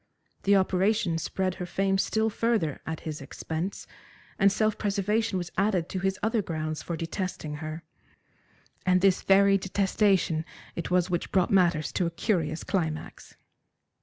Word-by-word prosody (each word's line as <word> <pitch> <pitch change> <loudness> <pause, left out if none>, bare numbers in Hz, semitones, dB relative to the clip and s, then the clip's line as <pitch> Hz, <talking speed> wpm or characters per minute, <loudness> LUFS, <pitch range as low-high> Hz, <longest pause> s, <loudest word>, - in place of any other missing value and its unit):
The 200 +1 +5
operation 190 -2 +2
spread 185 +2 -1
her 180 - -3
fame 195 +2 +1
still 220 +2 +1
further 215 - 0
at 160 -1 -4
his 155 -2 -5
expense, 160 +6 -5 0.5
and 200 +1 +5
self 215 +1 +1
preservation 210 +1 0
was 175 -1 -4
added 195 -4 +1
to 190 - -3
his 190 +1 0
other 220 0 +2
grounds 155 -3 -3
for 170 - -4
detesting 165 -3 -4
her. 155 +2 -6 1.0
And 185 0 +3
this 195 -1 +4
very 195 0 +5
detestation 190 -3 +1 0.3
it 170 - -4
was 180 0 +2
which 175 - -2
brought 185 -2 +2
matters 170 -7 +3
to 180 - 0
a - - 0
curious 165 -3 -1
climax. 160 -5 -3
185 Hz, 150 wpm, -27 LUFS, 165-200 Hz, 1.0 s, The